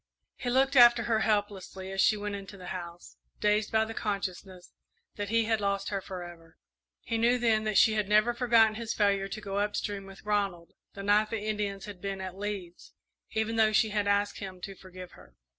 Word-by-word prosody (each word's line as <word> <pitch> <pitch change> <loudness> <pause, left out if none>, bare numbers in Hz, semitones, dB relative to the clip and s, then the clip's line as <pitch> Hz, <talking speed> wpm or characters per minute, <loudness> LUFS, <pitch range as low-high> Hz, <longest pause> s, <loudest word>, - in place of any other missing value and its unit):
He 245 - -4
looked 265 +2 +2
after 240 -2 +7
her 225 -1 +1
helplessly 205 -3 -2
as 195 0 0
she 215 - +4
went 205 0 -4
into 195 0 -8
the 180 -1 -9
house, 175 -1 -9 0.2
dazed 210 0 +1
by 220 -1 +3
the 225 - -7
consciousness 195 -3 -5 0.4
that 205 -1 -4
he 230 0 +2
had 220 -1 0
lost 200 0 -1
her 195 -1 -2
forever. 175 -3 -10 0.4
He 230 -1 -2
knew 240 +2 +3
then 225 -3 +2
that 215 -2 +1
she 220 - +6
had 210 -2 -1
never 215 +3 +4
forgotten 235 -3 +4
his 230 -1 -4
failure 200 -2 +2
to 215 - -6
go 200 -1 -3
up 205 0 -1
stream 200 -2 -4
with 195 +1 -13
Ronald 200 -5 -1 0.2
the 200 - -7
night 210 +1 +3
the 215 -2 -4
Indians 205 -2 -2
had 200 -4 -10
been 195 -1 -4
at 185 -1 -6
Lee's, 195 -3 -6 0.4
even 220 +1 -1
though 215 -1 +4
she 220 +1 +3
had 205 -1 -1
asked 205 0 +1
him 190 -2 -7
to 195 - -6
forgive 185 -1 -11
her. - - -18
205 Hz, 210 wpm, -29 LUFS, 195-220 Hz, 0.4 s, after